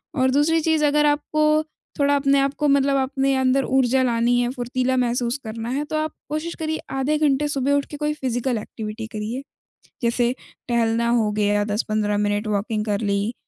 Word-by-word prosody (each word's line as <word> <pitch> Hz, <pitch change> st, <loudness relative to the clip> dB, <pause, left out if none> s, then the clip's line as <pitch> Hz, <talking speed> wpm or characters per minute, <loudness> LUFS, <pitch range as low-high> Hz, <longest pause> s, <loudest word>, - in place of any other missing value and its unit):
और 260 Hz, -1 st, +2 dB
दूसरी 305 Hz, +4 st, +3 dB
चीज़, 315 Hz, -1 st, +2 dB
अगर 295 Hz, +1 st, +3 dB
आपको 305 Hz, +1 st, +2 dB, 0.4 s
थोड़ा 285 Hz, 0 st, +3 dB
अपने 280 Hz, 0 st, +3 dB
आप 275 Hz, 0 st, +1 dB
को 295 Hz, -, +2 dB
मतलब 275 Hz, 0 st, +3 dB
अपने 270 Hz, 0 st, 0 dB
अंदर 260 Hz, +1 st, +2 dB
ऊर्जा 265 Hz, 0 st, +2 dB
लानी 240 Hz, 0 st, +2 dB
है, 240 Hz, -, 0 dB
फुर्तीला 255 Hz, 0 st, -1 dB
महसूस 245 Hz, +1 st, 0 dB
करना 225 Hz, +1 st, -5 dB
है, 280 Hz, +3 st, -1 dB
तो 310 Hz, -, -5 dB
आप 310 Hz, 0 st, -2 dB, 0.2 s
कोशिश 310 Hz, +3 st, -3 dB
करिए 315 Hz, -1 st, -3 dB, 0.2 s
आधे 295 Hz, +3 st, +1 dB
घंटे 295 Hz, -1 st, +2 dB
सुबह 280 Hz, -1 st, 0 dB
उठ 285 Hz, -1 st, +1 dB
के 295 Hz, -, -6 dB
कोई 300 Hz, 0 st, -1 dB
फिज़िकल 250 Hz, -3 st, -2 dB
एक्टिविटी 220 Hz, +1 st, -7 dB
करिए, 220 Hz, +5 st, -5 dB, 0.6 s
जैसे 240 Hz, +1 st, +1 dB, 0.3 s
टहलना 235 Hz, 0 st, +1 dB
हो 225 Hz, -3 st, +2 dB
गया, 205 Hz, 0 st, +1 dB
10-15 210 Hz, 0 st, -1 dB
मिनट 205 Hz, +1 st, 0 dB
वॉकिंग 210 Hz, +1 st, -1 dB
कर 205 Hz, -1 st, 0 dB
ली, 205 Hz, +2 st, -1 dB
255 Hz, 185 wpm, -22 LUFS, 225-285 Hz, 0.6 s, दूसरी